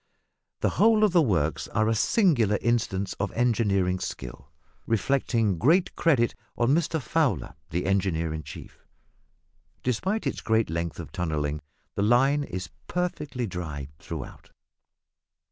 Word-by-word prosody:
The - - +3
whole 220 0 +5
of 210 - +5
the 175 -1 +5
works 85 - 0
are 110 0 +1
a 115 - +3
singular 115 - +3
instance 105 -5 0
of 100 - -1
engineering 100 -6 +1
skill, 70 - -7 0.4
reflecting 115 -4 +1
great 170 - +3
credit 130 -8 +3 0.2
on 120 +3 +3
Mr 165 0 +1
Fowler, 125 - 0 0.2
the 90 +3 -2
engineer 90 -5 0
in 80 - -4
chief. 75 - -11 1.0
Despite 190 - -1
its - - -2
great 110 -6 +1
length 85 -1 -3
of - - -7
tunnelling 75 -3 -2 0.3
the - - -2
line 135 +7 +4
is 95 -8 -6 0.2
perfectly 150 -8 -2
dry 80 -8 -5
throughout. - - -8
110 Hz, 130 wpm, -26 LUFS, 90-140 Hz, 1.0 s, whole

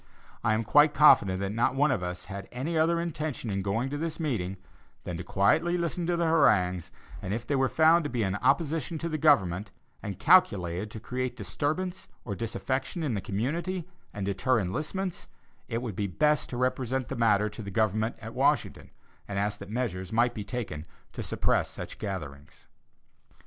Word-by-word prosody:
I 110 -1 +3
am 110 - 0
quite 150 +7 +5
confident 100 -10 +6
that 100 0 -2
not 115 +4 +1
one 145 +1 +3
of 125 - 0
us 90 0 -4
had 100 -1 -7
any 140 +7 -3
other 165 +2 +3
intention 155 -8 -3
in 100 0 -1
going 105 +6 -1
to 145 - -3
this 165 +1 -3
meeting, 100 - -2 0.5
than 90 - -4
to 90 - -5
quietly 160 - +2
listen 170 0 -2
to 175 -1 +1
the 170 - +1
harangues, 105 - +3 0.3
and 95 +3 -2
if 115 +1 -5
they 145 - 0
were 135 -1 +2
found 160 +2 +5
to - - -1
be 120 -2 -1
in 95 -1 0
opposition 155 +5 +1
to 165 - -3
the 155 -2 -3
government, 100 - +3 0.3
and 100 -3 -5
calculated 100 - +3
to 110 - -8
create 125 +2 -3
disturbance 150 - -3 0.2
or 105 - -3
disaffection 130 - -3
in 140 -6 0
the 100 - -2
community, 165 - -2 0.2
and 100 -2 -4
deter 105 +6 +1
enlistments, 155 - -3 0.4
it 115 +2 -3
would 110 -6 -4
be 100 +1 -1
best 150 - +1
to 120 - -5
represent 130 0 -1
the - - -4
matter 105 -3 +3
to 110 - -9
the 100 - -6
government 110 +3 0
at 115 +1 -7
Washington, - - +1 0.4
and 100 - -4
ask 105 +1 -1
that 100 - -9
measures 105 -6 -3
might 120 +2 +2
be 105 - -5
taken 100 -10 -5 0.3
to - - -5
suppress - - 0
such - - -7
gatherings. 75 -9 -7
120 Hz, 190 wpm, -28 LUFS, 100-150 Hz, 0.5 s, confident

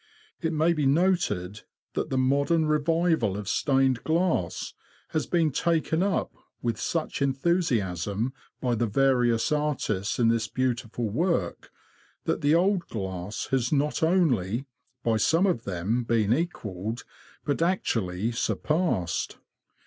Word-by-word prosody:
It 165 -2 0
may 160 +2 +2
be 150 -4 +1
noted 135 - +1 0.3
that - - -2
the 130 - -1
modern 140 +5 +2
revival 155 - +1
of 105 -2 -6
stained 135 0 +2
glass 160 - 0 0.4
has 155 - -1
been 165 -3 +2
taken 160 +2 +1
up 195 0 0 0.3
with 115 -2 -2
such 165 -3 -2
enthusiasm 125 - 0 0.3
by 125 -2 0
the 120 0 +1
various 120 0 +2
artists 145 -10 -1
in 115 -2 +3
this 115 -1 +1
beautiful 120 -2 -2
work, 120 - -1 0.5
that - - -1
the 145 +2 +4
old 185 +1 +2
glass 95 0 -5
has 125 -3 +1
not 150 0 +1
only, 135 - +2 0.4
by 115 -1 +2
some 165 - +3
of 175 - 0
them, 100 +6 -1
been 115 -2 +2
equalled, 115 - -3 0.4
but 145 +2 -1
actually 115 - 0
surpassed. 135 - -1
130 Hz, 125 wpm, -27 LUFS, 110-160 Hz, 0.5 s, the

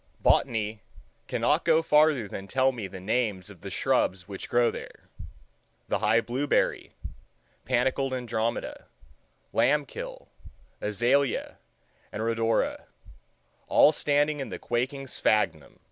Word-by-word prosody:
Botany 110 -2 +1 0.5
cannot - - +1
go 160 +1 +3
farther 150 -7 +3
than 95 0 -7
tell 130 +4 +2
me 115 -6 -6
the 95 - -9
names 105 -2 -1
of 95 - -15
the - - -7
shrubs 90 -1 0
which 100 -2 -7
grow 120 0 +3
there—the 60 0 -9
high 110 +2 +3
blueberry, 130 +5 0 0.7
panicled 130 +2 +1
andromeda, 115 -3 -3 0.7
lamb 140 +6 +3
kill, - - -8 0.5
azalea, 120 +6 0 0.5
and 110 - -4
rhodora—all 115 +5 0
standing 145 0 +1
in 135 - -4
the - - -5
quaking 130 +4 -2
sphagnum. 95 - 0
120 Hz, 110 wpm, -27 LUFS, 105-135 Hz, 0.7 s, go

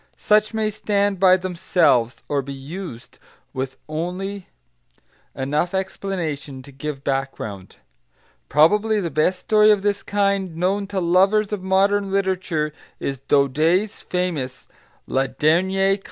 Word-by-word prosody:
Such 215 0 +3
may 220 -1 -1
stand 205 -2 0
by 185 -1 +6
themselves, 170 -10 +1
or 145 -1 0
be 140 +1 -7
used 140 -2 -9 0.3
with 130 0 -4
only 180 +5 -4 0.9
enough 150 +7 -1
explanation 165 -8 -4
to 140 - -13
give 140 +1 -6
background. 135 -9 -4 0.7
Probably 210 +9 +4
the 170 -5 -3
best 155 +6 +1
story 215 -1 +4
of 205 -2 +3
this 205 -1 0
kind 200 -3 0
known 195 +4 0
to 200 -1 -2
lovers 195 +4 +3
of 205 - -3
modern 195 +1 +2
literature 185 -6 -1 0.3
is 135 -2 -3
Daudet's 155 - +1
famous 160 -8 -3 0.4
La 135 0 0
Dernière 190 +8 +2
Classe. 200 - -3
180 Hz, 125 wpm, -22 LUFS, 145-195 Hz, 0.9 s, by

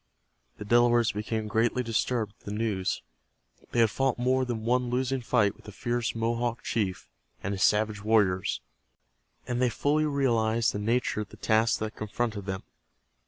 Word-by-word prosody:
The 105 - -7
Delawares 120 +1 +4
became 110 +1 -3
greatly 115 +3 +1
disturbed 115 -2 -1
at - - -28
the - - -3
news. 105 -3 -1 0.7
They 120 - +3
had 110 -2 +4
fought 135 -2 +1
more 130 +1 +2
than 115 -3 -4
one 125 +1 +1
losing 130 +1 0
fight 110 -4 +2
with - - -21
the 105 - -8
fierce 120 +2 -2
Mohawk 115 +1 -1
chief 100 -5 -2 0.4
and 100 - -1
his 95 - -4
savage 105 0 +2
warriors, 105 -4 +2 0.9
and 125 0 -1
they 125 - +4
fully 150 +6 +1
realized 120 -4 +1
the 105 - -3
nature 115 +1 0
of 105 - -7
the - - -13
task 110 +1 +2
that 110 -1 -3
confronted 110 -1 -3
them. 95 -1 -3
115 Hz, 165 wpm, -28 LUFS, 105-120 Hz, 0.9 s, Delawares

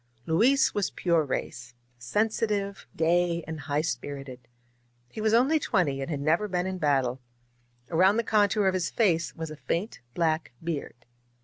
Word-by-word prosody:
Luis 235 +12 +3
was 205 -2 0
pure 170 -3 +1
race 125 -3 -5
— 125 - -40
sensitive, 205 - -1
gay 170 +1 +2
and 160 0 -6
high 145 +1 -1
spirited. 130 -3 -5 0.6
He 215 - -7
was 215 0 +2
only 260 +8 +4
twenty, 170 - 0
and 135 - -4
had 145 -3 -3
never 165 +8 +2
been 180 -2 -1
in 190 0 -3
battle. 135 -4 +1 0.7
Around 185 +5 +4
the 230 - +1
contour 210 -1 +2
of 190 - +2
his 185 -2 -1
face 175 -7 +1
was 160 -1 -5
a - - -7
faint 170 +7 -3 0.2
black 160 -5 0
beard. 145 -7 -5
170 Hz, 165 wpm, -27 LUFS, 145-205 Hz, 0.7 s, only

